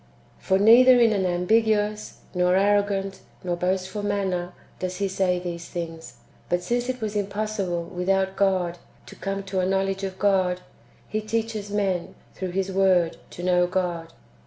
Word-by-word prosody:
"^ - - -27
For 190 - +2
neither 245 +5 +7
in 230 -2 +5
an 190 -2 +1
ambiguous, 210 +3 +1
nor 180 0 +2
arrogant, 200 0 +1 0.2
nor 175 -1 -1
boastful 185 +3 -2
manner, 190 -3 -1 0.3
does 185 0 -3
He 200 0 0
say 190 -1 +1
these 175 -1 -6
things; 165 -6 -6 0.3
but 175 0 0
since 240 +3 -1
it 255 -1 -3
was 215 -1 -3
impossible, 200 -3 -2
without 190 +2 -1
God, 185 -3 +1 0.3
to - - -12
come 195 0 -4
to 195 -1 -2
a 180 - +1
knowledge 195 0 0
of 190 -1 -4
God, 185 -2 +2 0.5
He 215 - -2
teaches 220 -1 -3
men, 195 -4 -1 0.2
through 185 -1 -4
His 195 0 -1
Word, 185 -3 +3
to 175 - -9
know 180 -1 +3
God. 175 -3 -2
190 Hz, 160 wpm, -25 LUFS, 180-205 Hz, 0.5 s, neither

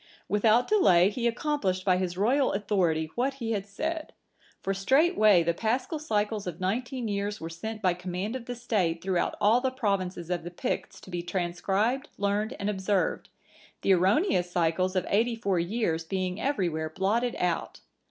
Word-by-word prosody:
Without 215 +5 +3
delay 190 - +5
he 240 +2 -1
accomplished 230 -7 -1
by 185 -2 +4
his 180 -1 -2
royal 255 +8 +2
authority 175 -6 0
what 265 +3 0
he 230 -4 -4
had 200 -2 -2
said. 315 +10 -4 0.5
For 195 - 0
straightway 215 - +4
the 170 +1 +1
Paschal 250 - -1
cycles 210 -7 -1
of 175 -1 -5
nineteen 240 +6 -2
years 205 0 -2
were 165 +1 -6
sent 215 +6 -6
by 185 -2 +4
command 180 +5 -4
of 250 -3 -6
the 245 - -5
State 200 -9 -1
throughout 185 -2 0
all 225 +4 +4
the 260 - +1
provinces 195 -8 -2
of 175 -2 -1
the 175 - -5
Picts 175 - -4
to 190 - -12
be 175 -1 -2
transcribed, 190 +9 -1
learned, 205 +4 0
and 200 - -2
observed, 195 -1 0 0.5
the 195 - +5
erroneous 190 - +2
cycles 175 +2 0
of 185 - +1
eighty 230 +3 +2
four 200 -6 0
years 170 -3 -1
being 185 +2 -3
everywhere 170 - -1
blotted 215 +8 0
out. 175 -2 -2
200 Hz, 170 wpm, -28 LUFS, 180-235 Hz, 0.5 s, delay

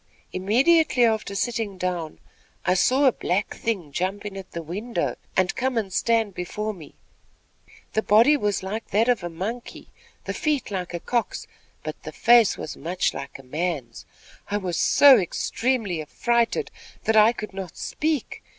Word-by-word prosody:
Immediately 250 - +3
after 220 -3 0
sitting 220 -2 -2
down, 175 -4 -3 0.5
I 180 - +3
saw 260 +9 +3
a 265 - +7
black 200 -2 -1
thing 190 -10 -3
jump 190 +7 -2
in 200 -2 -6
at 190 -1 -8
the 170 - -6
window 205 +9 -3 0.2
and 185 -1 +2
come 260 -1 -1
and 195 -4 -2
stand 225 +2 +1
before 210 +5 -4
me. 165 -6 -13 1.0
The 220 - +2
body 225 +8 +5
was 205 -8 -1
like 215 +4 -4
that 220 +3 +2
of 245 -7 +2
a 175 - -3
monkey, 215 +9 -6 0.4
the - - -3
feet 300 -9 -1
like 180 -2 -3
a - - -3
cock's; 235 +6 -2 0.4
but - - -6
the - - -7
face 235 -3 +5
was 150 - -6
much 175 +4 -1
like 140 - -7
a 135 - -14
man's. 150 -1 -4 0.4
I 205 - 0
was 185 -4 -3
so 275 - +7
extremely 205 0 -1
affrighted, 235 - 0 0.3
that 220 - +1
I 215 +1 +7
could 215 -4 -7
not 190 -3 -7
speak. 305 -4 -2
210 Hz, 165 wpm, -24 LUFS, 180-235 Hz, 1.0 s, a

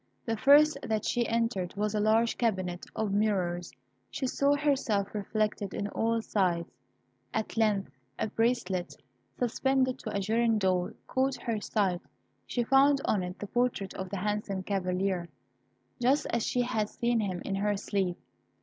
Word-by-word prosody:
The 225 - 0
first 290 +6 +6
that 220 -3 -1
she 240 -1 +1
entered 230 -6 -1
was 210 +1 -1
a 210 - +1
large 220 +2 +3
cabinet 185 -6 -1
of 215 -3 -1
mirrors. 185 -5 0 0.4
She - - -3
saw 280 +2 +2
herself 270 -9 0
reflected 210 -1 -1
on 200 - -2
all 230 +1 0
sides. 175 -6 0 0.6
At 220 -1 -2
length 210 -7 +1 0.3
a - - 0
bracelet, 220 -5 0 0.4
suspended 260 +1 +1
to 220 - -5
a 200 - -1
girandole, 205 -4 +1
caught 265 0 0
her 225 -3 -1
sight. 190 -5 0 0.5
She 240 - 0
found 275 +3 +5
on 205 - +2
it 180 +1 -5
the - - -5
portrait 240 -3 -1
of 190 -1 -5
the 200 - -3
handsome 205 -1 -2
Cavalier, 185 -2 -1 0.7
just 265 +4 +3
as 235 -1 0
she 245 - +1
had 220 -3 -1
seen 235 -1 0
him 185 -5 -2
in 195 - -2
her 205 +1 0
sleep. 195 -3 -1
215 Hz, 155 wpm, -29 LUFS, 195-235 Hz, 0.7 s, first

